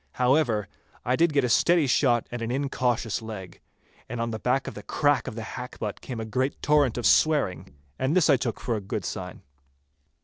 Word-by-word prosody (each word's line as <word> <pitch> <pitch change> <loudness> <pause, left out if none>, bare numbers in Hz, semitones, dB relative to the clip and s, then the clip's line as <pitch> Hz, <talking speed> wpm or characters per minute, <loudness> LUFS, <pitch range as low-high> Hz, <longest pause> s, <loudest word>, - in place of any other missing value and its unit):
However, 125 -5 +2 0.4
I 125 - +2
did 170 +2 +3
get 140 -2 +2
a - - +2
steady 170 +7 +4
shot 125 -3 +2
at 120 -1 -5
an 115 - -3
incautious 125 -4 -1
leg, 105 -5 -8 0.5
and 120 +1 -4
on 115 0 -1
the 110 - -4
back 130 +4 0
of - - -5
the - - -8
crack 145 -2 +1
of - - -5
the 115 - -5
hackbutt 110 -3 -6
came 125 -4 -6
a 110 - -4
great 130 +5 -1
torrent 145 -5 +3
of 120 - -3
swearing, 140 - +2 0.2
and 135 +5 +1
this 180 -4 +4
I 145 - +6
took 120 -2 -3
for 120 - -2
a 105 - -3
good 95 - -4
sign. - - -6
125 Hz, 205 wpm, -26 LUFS, 110-140 Hz, 0.5 s, I